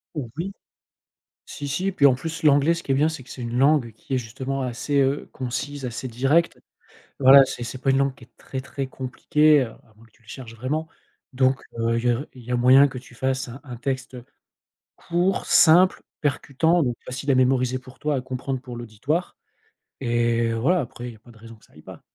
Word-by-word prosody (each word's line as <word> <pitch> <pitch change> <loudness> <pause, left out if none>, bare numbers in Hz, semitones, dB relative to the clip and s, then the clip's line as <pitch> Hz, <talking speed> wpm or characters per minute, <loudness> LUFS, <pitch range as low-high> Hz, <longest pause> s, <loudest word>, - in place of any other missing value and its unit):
Oui. 150 - -5 0.9
Si, 145 -1 -7
si. 190 +7 -1
Puis 145 -5 +4
en 130 - +5
plus, 160 +5 -6
l'anglais, 150 +2 +4
ce 165 - -6
qui - - -9
est 135 - +4
bien, 150 +3 +3
c'est 155 -5 -6
que - - -17
c'est 125 - -8
une 120 +1 -4
langue 135 -4 +3
qui 125 +5 -6
est 130 - +2
justement 130 +4 -4
assez, 130 +3 -2
heu, 135 +1 0
concise, 135 +2 -5
assez 125 +1 -4
directe. 135 +8 +1 0.6
Voilà, 135 +1 +9
c'est 120 - -6
c'est 125 - -6
pas 135 - +1
une 135 - +3
langue 140 -1 +1
qui 120 - -16
est 120 - -36
très 130 - -6
très 135 0 -5
compliquée, 145 +3 +2
heu, 125 - -4
à 110 - -21
moins 115 +1 -19
que 115 - -25
tu 120 - -29
le 110 - -28
cherches 115 0 -9
vraiment. 150 +7 -3 0.5
Donc 130 +1 +2 0.2
heu, 115 0 +1
il 115 - -3
y - - +4
a 120 +5 0
il 125 -2 -13
y 125 - -7
a 125 - +2
moyen 130 +3 +6
que 135 - -8
tu 125 -1 -17
fasses 130 +1 -1
un 125 +3 -9
un 125 -4 -8
texte, 130 +1 -4
heu, 125 -1 -10 0.7
court, 175 +3 -1
simple, 180 +3 +5 0.2
percutant 155 +4 +1
donc 120 -3 -1
facile 135 +2 -4
à - - +4
mémoriser 130 0 +2
pour 130 0 -15
toi, 150 0 -1
à - - -1
comprendre 130 0 -4
pour 125 -3 -9
l'auditoire 120 - -3 0.7
et 120 -1 +1
voilà, 160 +10 +2
après, 125 -1 -7
il - - -7
y - - -15
a - - -23
pas 120 - -18
de 115 - -17
raison 115 +1 -12
que 110 - -22
ça - - -25
aille 75 - -15
pas. 95 -3 -12
130 Hz, 230 wpm, -23 LUFS, 120-145 Hz, 0.9 s, Voilà